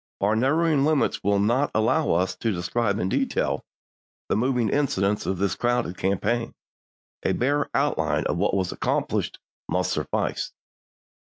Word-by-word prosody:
Our 105 Hz, +2 st, +2 dB
narrow 140 Hz, +9 st, +2 dB
ing 150 Hz, -4 st, +3 dB
limits 150 Hz, -1 st, +1 dB
will 100 Hz, 0 st, +2 dB
not 120 Hz, +8 st, +2 dB
allow 110 Hz, -, +2 dB
us 90 Hz, +2 st, +1 dB
to 115 Hz, -, 0 dB
describe 100 Hz, +3 st, 0 dB
in 90 Hz, -, -1 dB
detail -, -, 0 dB, 0.7 s
the -, -, +2 dB
moving 120 Hz, 0 st, +1 dB
incidents 105 Hz, -8 st, 0 dB
of 95 Hz, -, 0 dB
this 95 Hz, 0 st, 0 dB
crowded 120 Hz, -5 st, 0 dB
campaign; 105 Hz, +6 st, -1 dB, 0.7 s
a -, -, +1 dB
bare 145 Hz, +3 st, +1 dB
outline -, -, +1 dB
of -, -, 0 dB
what -, -, +1 dB
was 95 Hz, -2 st, 0 dB
accomplished -, -, -1 dB, 0.3 s
must 90 Hz, 0 st, 0 dB
suffice. 75 Hz, -, -2 dB
110 Hz, 150 wpm, -25 LUFS, 95-130 Hz, 0.7 s, ing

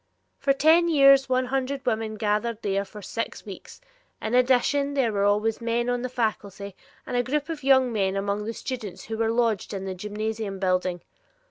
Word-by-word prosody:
For 275 Hz, -, +2 dB
ten 320 Hz, +5 st, +4 dB
years 275 Hz, -4 st, +6 dB
one 255 Hz, 0 st, +2 dB
hundred 270 Hz, +1 st, -2 dB
women 220 Hz, -2 st, -1 dB
gathered 215 Hz, +2 st, -1 dB
there 200 Hz, -1 st, 0 dB
for 210 Hz, 0 st, -11 dB
six 230 Hz, +5 st, -5 dB
weeks, 195 Hz, -3 st, -10 dB, 0.4 s
in 220 Hz, -, -4 dB
addition 265 Hz, +3 st, +2 dB
there 245 Hz, -6 st, +1 dB
were 200 Hz, 0 st, +1 dB
always 210 Hz, +3 st, +1 dB
men 235 Hz, +1 st, 0 dB
on 245 Hz, 0 st, -1 dB
the 255 Hz, -, -3 dB
faculty, 205 Hz, -5 st, -3 dB, 0.3 s
and -, -, -4 dB
a -, -, +3 dB
small -, -, +2 dB
group 295 Hz, +2 st, -1 dB
of 315 Hz, -4 st, -5 dB
young 260 Hz, -2 st, +4 dB
men 195 Hz, -2 st, 0 dB
among 200 Hz, +1 st, -2 dB
the 225 Hz, -, -3 dB
students 215 Hz, -8 st, -6 dB
who 225 Hz, -, -5 dB
were 225 Hz, -1 st, +2 dB
lodged 225 Hz, -4 st, 0 dB
in 195 Hz, 0 st, -5 dB
the 190 Hz, -, -3 dB
gymnasium 210 Hz, +1 st, -4 dB
building. 185 Hz, -2 st, 0 dB
225 Hz, 195 wpm, -25 LUFS, 205-255 Hz, 0.4 s, years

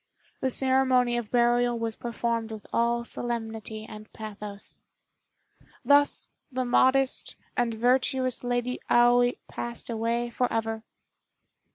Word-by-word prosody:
The 265 Hz, -, 0 dB
ceremony 260 Hz, -2 st, +3 dB
of 240 Hz, -3 st, -3 dB
burial 240 Hz, 0 st, +3 dB
was 230 Hz, -1 st, -3 dB
performed 230 Hz, -1 st, -2 dB
with 215 Hz, -1 st, -8 dB
all 235 Hz, 0 st, +2 dB
solemnity 225 Hz, -2 st, -4 dB
and 215 Hz, 0 st, -11 dB
pathos. 210 Hz, -2 st, -4 dB, 1.1 s
Thus 285 Hz, 0 st, +3 dB, 0.2 s
the 255 Hz, 0 st, -1 dB
modest 260 Hz, +2 st, +2 dB, 0.2 s
and 235 Hz, -2 st, 0 dB
virtuous 255 Hz, +2 st, +1 dB
Lady 245 Hz, 0 st, -1 dB
Aoi 245 Hz, 0 st, +5 dB
passed 235 Hz, 0 st, -5 dB
away 235 Hz, +1 st, -1 dB
forever. 225 Hz, -2 st, -1 dB
240 Hz, 105 wpm, -27 LUFS, 225-250 Hz, 1.1 s, Aoi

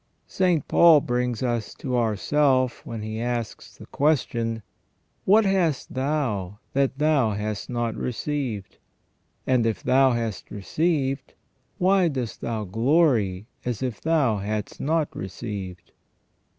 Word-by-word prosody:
St. 180 Hz, -5 st, +1 dB
Paul 165 Hz, -3 st, +7 dB
brings 125 Hz, -1 st, -1 dB
us 120 Hz, -3 st, -2 dB
to 130 Hz, -2 st, -3 dB
ourself 130 Hz, +3 st, +1 dB
when 115 Hz, -2 st, -5 dB
he 110 Hz, +1 st, -4 dB
asks 120 Hz, -2 st, -4 dB
the -, -, -11 dB
question: 120 Hz, -7 st, 0 dB, 0.3 s
" -, -, -45 dB
What 210 Hz, +3 st, +5 dB
hast 180 Hz, -8 st, 0 dB
thou 130 Hz, -9 st, -1 dB, 0.2 s
that 135 Hz, -1 st, +1 dB
thou 145 Hz, -7 st, +2 dB
hast 105 Hz, 0 st, -4 dB
not 120 Hz, -2 st, -1 dB
received? 125 Hz, -5 st, -3 dB, 0.7 s
And 125 Hz, -2 st, +3 dB
if 110 Hz, -5 st, -2 dB
thou 135 Hz, 0 st, +4 dB
hast 115 Hz, -4 st, -3 dB
received, 135 Hz, -, -1 dB, 0.4 s
why 190 Hz, -1 st, +4 dB
dost 130 Hz, -7 st, -4 dB
thou 110 Hz, -2 st, -2 dB
glory 115 Hz, -, +2 dB, 0.2 s
as 125 Hz, 0 st, -3 dB
if 125 Hz, -5 st, -3 dB
thou 150 Hz, -9 st, +2 dB
hadst 105 Hz, +1 st, -4 dB
not 155 Hz, +1 st, 0 dB
received 95 Hz, -2 st, -6 dB
125 Hz, 125 wpm, -25 LUFS, 110-145 Hz, 0.7 s, Paul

